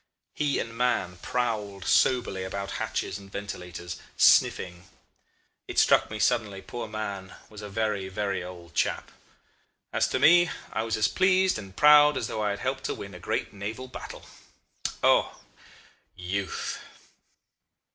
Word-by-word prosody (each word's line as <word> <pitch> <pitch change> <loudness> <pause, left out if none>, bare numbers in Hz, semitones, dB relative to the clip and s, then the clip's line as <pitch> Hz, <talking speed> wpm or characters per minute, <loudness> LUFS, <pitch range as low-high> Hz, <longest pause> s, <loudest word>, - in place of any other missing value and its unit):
He 145 -2 0
and 115 0 -4
Mahon 120 -7 0
prowled 105 -3 -2
soberly 120 -7 +2
about 100 +1 -4
hatches - - -2
and 100 -1 -14
ventilators, 90 -4 -6 0.2
sniffing. 90 +1 +3 0.8
It - - -7
struck - - +5
me 110 - -5
suddenly 105 -3 +1
poor 120 +3 -6
Mahon 100 -3 -5 0.2
was 105 -1 -9
a 105 - -7
very, 100 -2 -1
very 95 -1 -2
old 85 -3 -10
chap. - - -1 0.8
As - - +2
to - - -1
me, 175 +2 +6 0.2
I - - 0
was 115 -1 -1
as 110 - +3
pleased 185 -4 +3
and 95 -2 -11
proud 150 -1 +7
as 115 - -1
though 110 - -3
I 105 - +1
had 100 0 -3
helped 130 +1 -2
to - - -1
win 100 0 -8
a 90 - -9
great - - -2
naval 105 +6 -6
battle. 130 - -9 0.8
O! - - +3 0.8
Youth! 95 +2 -3
105 Hz, 145 wpm, -27 LUFS, 95-120 Hz, 0.8 s, proud